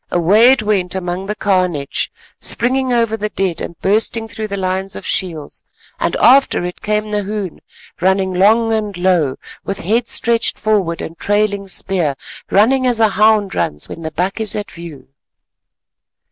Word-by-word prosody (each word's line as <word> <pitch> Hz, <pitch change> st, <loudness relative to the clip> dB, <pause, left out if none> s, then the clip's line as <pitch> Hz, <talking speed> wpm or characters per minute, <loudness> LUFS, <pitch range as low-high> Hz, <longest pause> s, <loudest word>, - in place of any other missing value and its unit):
Away 205 Hz, +8 st, +5 dB
it 250 Hz, -5 st, -2 dB
went 190 Hz, -4 st, 0 dB
among 185 Hz, +1 st, -4 dB
the 210 Hz, -, -2 dB
carnage, 180 Hz, -9 st, 0 dB, 0.3 s
springing 260 Hz, +2 st, 0 dB
over 230 Hz, -2 st, +1 dB
the 210 Hz, -1 st, -3 dB
dead 190 Hz, -5 st, -2 dB
and 170 Hz, -, -7 dB
bursting 225 Hz, +3 st, +1 dB
through 220 Hz, -1 st, -5 dB
the 200 Hz, -1 st, -4 dB
lines 190 Hz, 0 st, -2 dB
of -, -, -8 dB
shields, 165 Hz, -6 st, -2 dB, 0.4 s
and -, -, 0 dB
after 260 Hz, -8 st, +4 dB
it 180 Hz, -, -7 dB
came 210 Hz, 0 st, -1 dB
Nahoon, 205 Hz, -3 st, -3 dB, 0.4 s
running 190 Hz, 0 st, +1 dB
long 220 Hz, +5 st, +3 dB
and 210 Hz, -3 st, -2 dB
low 175 Hz, -7 st, +1 dB, 0.3 s
with 195 Hz, +1 st, -4 dB
head 230 Hz, +6 st, 0 dB
stretched 235 Hz, 0 st, +1 dB
forward 195 Hz, -6 st, 0 dB
and 165 Hz, +1 st, -8 dB
trailing 205 Hz, -1 st, 0 dB
spear, 175 Hz, -5 st, -1 dB, 0.3 s
running 255 Hz, +6 st, +3 dB
as 240 Hz, -2 st, +1 dB
a 220 Hz, -1 st, +4 dB
hound 210 Hz, -1 st, +3 dB
runs 75 Hz, -, -2 dB
when 165 Hz, -, -8 dB
the 160 Hz, -, -4 dB
buck 180 Hz, +6 st, -2 dB
is 220 Hz, -2 st, +2 dB
at 205 Hz, -1 st, -5 dB
view. 170 Hz, -4 st, -10 dB
200 Hz, 160 wpm, -17 LUFS, 180-220 Hz, 0.4 s, Away